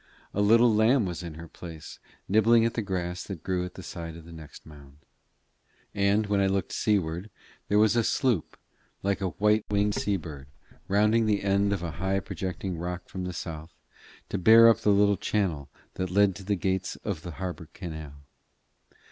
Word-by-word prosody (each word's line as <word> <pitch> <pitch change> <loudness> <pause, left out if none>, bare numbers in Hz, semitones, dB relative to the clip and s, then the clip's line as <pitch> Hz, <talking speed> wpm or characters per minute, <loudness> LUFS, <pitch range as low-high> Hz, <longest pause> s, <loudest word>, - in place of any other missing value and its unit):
A 100 - 0
little 115 +3 +5
lamb 110 +2 +4
was 90 -1 -4
in 85 -3 -7
her 85 +1 -9
place, 80 -1 -10 0.3
nibbling 115 +3 +4
at 115 - 0
the 115 - -1
grass 90 -3 -3
that 95 -6 -7
grew 90 -1 -1
on - - -6
the 95 - -9
side 85 -2 -7
of 85 - -13
the 85 - -12
next 80 -2 -12
mound. 70 -2 -15 1.0
And 100 +1 +2
when 100 -1 +1
I 95 - +3
looked 95 -1 -1
seaward 95 -2 -1 0.4
there 105 - +2
was 110 0 +4
a 120 - +3
sloop, 120 - 0 0.5
like 100 0 0
a 95 - 0
white 105 +4 +2
winged 105 0 +1
sea 100 -1 0
bird, 75 -6 -9 0.4
rounding 105 +3 +3
the 105 -2 +1
end 100 +1 +2
of 100 -4 -2
a 85 - -3
high 95 +1 +1
projecting 95 -2 -5
rock 90 +1 -5
from 95 -1 -5
the 90 - -3
south, 80 -1 -7 0.5
to - - -2
bear 115 +4 +8
up 115 - +3
the - - +1
little 100 0 +4
channel 85 -9 -1 0.2
that 95 0 -3
led 100 +1 +3
to 100 - -10
the 100 +2 0
gates 95 0 -2
of 100 -7 -3
the 85 0 -7
harbour 90 -3 -5
canal. 80 -6 -8
95 Hz, 190 wpm, -27 LUFS, 85-105 Hz, 1.0 s, bear